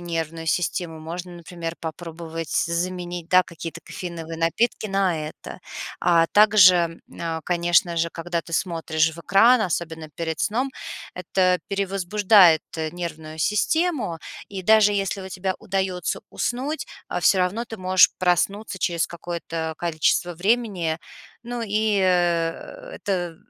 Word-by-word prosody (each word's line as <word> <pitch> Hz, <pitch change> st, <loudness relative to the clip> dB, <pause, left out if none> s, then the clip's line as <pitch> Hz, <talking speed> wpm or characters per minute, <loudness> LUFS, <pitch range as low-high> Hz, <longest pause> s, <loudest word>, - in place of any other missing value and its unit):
нервную 165 Hz, -1 st, -4 dB
систему, 165 Hz, 0 st, -1 dB
можно, 170 Hz, +3 st, -7 dB
например, 170 Hz, -1 st, -7 dB
попробовать 165 Hz, 0 st, -6 dB
заменить, 175 Hz, 0 st, -2 dB
да, 185 Hz, 0 st, +6 dB
какие-то 170 Hz, -2 st, -8 dB
кофеиновые 165 Hz, -2 st, -7 dB
напитки 215 Hz, +8 st, +1 dB
на 185 Hz, -6 st, 0 dB
это. -, -, -10 dB, 0.4 s
А 170 Hz, -2 st, +4 dB
также, 205 Hz, -3 st, +7 dB, 0.4 s
м, -, -, -14 dB
а, 165 Hz, -1 st, -2 dB
конечно 175 Hz, -1 st, +2 dB
же, 165 Hz, +1 st, +1 dB
когда 170 Hz, +1 st, -3 dB
ты 165 Hz, -, -7 dB
смотришь 160 Hz, -2 st, +1 dB
в -, -, -13 dB
экран, 225 Hz, +8 st, +5 dB
особенно 165 Hz, -5 st, -3 dB
перед 160 Hz, +1 st, -4 dB
сном, 250 Hz, +6 st, 0 dB, 0.4 s
это 180 Hz, 0 st, +1 dB
перевозбуждает 195 Hz, -2 st, +4 dB, 0.3 s
нервную 160 Hz, -3 st, -6 dB
систему, 220 Hz, -, +1 dB, 0.3 s
и 195 Hz, -2 st, -6 dB
даже 215 Hz, +1 st, +5 dB
если 195 Hz, 0 st, -1 dB
у 190 Hz, -, -7 dB
тебя 190 Hz, 0 st, -2 dB
удаётся 190 Hz, -2 st, -2 dB
уснуть, 270 Hz, +6 st, -2 dB, 0.2 s
а, -, -, -2 dB
всё 190 Hz, -, +4 dB
равно 200 Hz, +7 st, -1 dB
ты 225 Hz, -, -7 dB
можешь 185 Hz, -1 st, +5 dB
проснуться 190 Hz, +3 st, 0 dB
через 170 Hz, -1 st, 0 dB
какое-то 165 Hz, -1 st, -5 dB
количество 170 Hz, +1 st, +1 dB
времени. 190 Hz, -4 st, 0 dB, 0.5 s
Ну 240 Hz, 0 st, -5 dB
и, 215 Hz, -1 st, +1 dB
э, 175 Hz, -, 0 dB
это 175 Hz, -4 st, -2 dB
175 Hz, 130 wpm, -23 LUFS, 165-195 Hz, 0.5 s, также